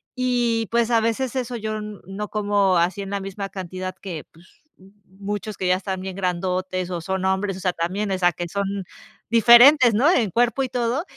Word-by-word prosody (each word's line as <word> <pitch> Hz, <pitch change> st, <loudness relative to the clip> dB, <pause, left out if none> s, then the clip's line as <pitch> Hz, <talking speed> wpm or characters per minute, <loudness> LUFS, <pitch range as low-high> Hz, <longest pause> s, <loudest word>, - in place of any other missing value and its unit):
Y, 240 Hz, -3 st, 0 dB
pues, 235 Hz, 0 st, +1 dB
a 230 Hz, -, +4 dB
veces, 230 Hz, +3 st, -1 dB
eso 250 Hz, -1 st, -3 dB
yo 215 Hz, -1 st, -4 dB
n 210 Hz, -1 st, -7 dB
no 200 Hz, +2 st, -5 dB
como 205 Hz, -3 st, +1 dB
así 175 Hz, +3 st, 0 dB
en 195 Hz, -, -7 dB
la 200 Hz, -, -1 dB
misma 195 Hz, 0 st, -6 dB
cantidad 185 Hz, 0 st, -6 dB
que, 170 Hz, -6 st, -6 dB
pues, 170 Hz, +3 st, -22 dB, 0.5 s
muchos 205 Hz, +2 st, -6 dB
que 185 Hz, -, -2 dB
ya 180 Hz, -, +4 dB
están 190 Hz, 0 st, -4 dB
bien 190 Hz, -1 st, -6 dB
grandotes 185 Hz, 0 st, -2 dB
o 175 Hz, -1 st, -3 dB
son 190 Hz, +2 st, -3 dB
hombres, 190 Hz, 0 st, 0 dB
o -, -, -8 dB
sea, 180 Hz, 0 st, 0 dB
también, 190 Hz, +5 st, -2 dB
o 190 Hz, -, 0 dB
sea, 175 Hz, -1 st, +4 dB
que 175 Hz, +3 st, -5 dB
son 200 Hz, 0 st, -3 dB, 0.5 s
diferentes, 240 Hz, +3 st, +7 dB
¿no?, 250 Hz, +8 st, +3 dB
en 230 Hz, -, +2 dB
cuerpo 240 Hz, +4 st, +1 dB
y 260 Hz, -, -3 dB
todo. 245 Hz, +3 st, -1 dB
200 Hz, 205 wpm, -22 LUFS, 185-230 Hz, 0.5 s, diferentes